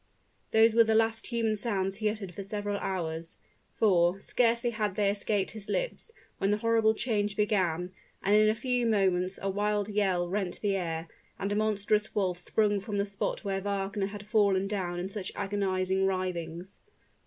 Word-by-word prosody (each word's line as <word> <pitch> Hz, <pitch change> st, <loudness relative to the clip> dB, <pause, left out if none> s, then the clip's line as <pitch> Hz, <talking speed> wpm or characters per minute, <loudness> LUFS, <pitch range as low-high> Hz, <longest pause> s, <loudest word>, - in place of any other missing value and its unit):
Those 220 Hz, 0 st, +5 dB
were 230 Hz, 0 st, +7 dB
the 220 Hz, 0 st, +1 dB
last 225 Hz, 0 st, +1 dB
human 230 Hz, -3 st, 0 dB
sounds 195 Hz, -3 st, -1 dB
he 215 Hz, -1 st, +1 dB
uttered 205 Hz, -4 st, -5 dB
for 200 Hz, -, -6 dB
several 205 Hz, +1 st, -3 dB
hours; 165 Hz, -3 st, -4 dB, 0.4 s
for, 180 Hz, -3 st, +3 dB
scarcely 235 Hz, +2 st, +1 dB
had 210 Hz, -4 st, -2 dB
they 200 Hz, -1 st, +2 dB
escaped 200 Hz, -1 st, -1 dB
his 215 Hz, -2 st, -10 dB
lips, -, -, -2 dB, 0.3 s
when 195 Hz, -, +1 dB
the 210 Hz, -, +2 dB
horrible 225 Hz, 0 st, +3 dB
change 210 Hz, -4 st, -1 dB
began, 185 Hz, -5 st, +1 dB, 0.3 s
and 200 Hz, +2 st, +4 dB
in 215 Hz, 0 st, +6 dB
a 215 Hz, -, +2 dB
few 245 Hz, 0 st, 0 dB
moments 190 Hz, -3 st, +1 dB
a -, -, 0 dB
wild 205 Hz, +1 st, 0 dB
yell 190 Hz, -4 st, +1 dB
rent 190 Hz, 0 st, -2 dB
the 200 Hz, -2 st, +1 dB
air, 165 Hz, -3 st, -3 dB, 0.3 s
and 200 Hz, +1 st, -2 dB
a -, -, +1 dB
monstrous 210 Hz, 0 st, +1 dB
wolf 185 Hz, -4 st, 0 dB
sprung 205 Hz, +2 st, +1 dB
from 205 Hz, +1 st, -4 dB
the 200 Hz, -, +1 dB
spot 200 Hz, +1 st, -3 dB
where 195 Hz, -1 st, -1 dB
Wagner 200 Hz, 0 st, -2 dB
had 205 Hz, 0 st, -8 dB
fallen 200 Hz, -3 st, +2 dB
down 180 Hz, -4 st, -2 dB
in 180 Hz, -, -3 dB
such 195 Hz, -1 st, -5 dB
agonizing 190 Hz, -1 st, 0 dB
writhings. 180 Hz, -1 st, -3 dB
200 Hz, 175 wpm, -29 LUFS, 190-215 Hz, 0.4 s, were